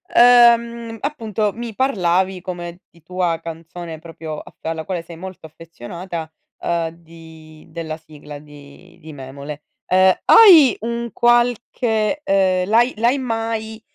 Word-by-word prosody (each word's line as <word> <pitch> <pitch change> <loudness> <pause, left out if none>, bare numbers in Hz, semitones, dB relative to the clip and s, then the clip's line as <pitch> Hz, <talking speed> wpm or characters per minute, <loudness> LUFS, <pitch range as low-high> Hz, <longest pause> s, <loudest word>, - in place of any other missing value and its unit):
uhm, 235 -1 +5
appunto, 220 -7 -2
mi 235 -1 -7
parlavi 190 -7 0
come 175 -1 -7
di 170 - -24
tua 175 0 -2
canzone 165 0 -8
proprio 160 -2 -8
af - - -14
alla 160 0 -4
quale 185 -3 -3
sei 170 0 -12
molto 185 -2 -9
affezionata, 165 +2 -8 0.3
uhm, 170 -1 -1
di 160 -1 -16
della 160 -1 -6
sigla 150 -2 -12
di 145 0 -16
di 160 0 -11
Memole. 140 +2 -9 0.3
Ehm, 185 0 +5
hai 340 - +8
un 235 0 -4
qualche, 240 0 +1
ehm, 190 -4 +1
l'hai 235 +4 +3
l'hai 240 +5 +2
mai, 225 -2 -4
180 Hz, 130 wpm, -19 LUFS, 160-230 Hz, 0.3 s, hai